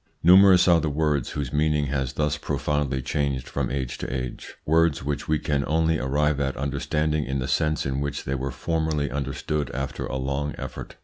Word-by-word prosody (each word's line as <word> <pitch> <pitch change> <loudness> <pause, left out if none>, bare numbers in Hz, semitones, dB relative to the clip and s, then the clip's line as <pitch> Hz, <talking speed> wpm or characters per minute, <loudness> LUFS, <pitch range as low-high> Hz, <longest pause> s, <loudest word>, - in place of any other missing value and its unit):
Numerous 95 +1 +7
are 85 -2 +5
the 80 - 0
words 75 -3 0
whose 70 -4 -4
meaning 75 0 +2
has 65 -1 -2
thus 75 +1 0
profoundly 75 -2 -1
changed 70 -2 -1
from - - -2
age 65 -2 -3
to - - -4
age 65 -2 -5
words 80 -2 +2
which 75 +1 -3
we 80 - +2
can 75 -2 -1
only 80 0 +2
arrive 75 +2 +1
at 70 -1 -1
understanding 75 +2 -1
in 65 0 -2
the 65 -1 -2
sense 75 -1 +1
in 70 +1 -1
which 70 0 -3
they 65 - -3
were 65 0 -2
formerly 80 -3 -1
understood 70 +1 -2
after 70 0 -3
a - - -3
long 70 +2 -2
effort. - - -7
75 Hz, 190 wpm, -25 LUFS, 70-75 Hz, -, Numerous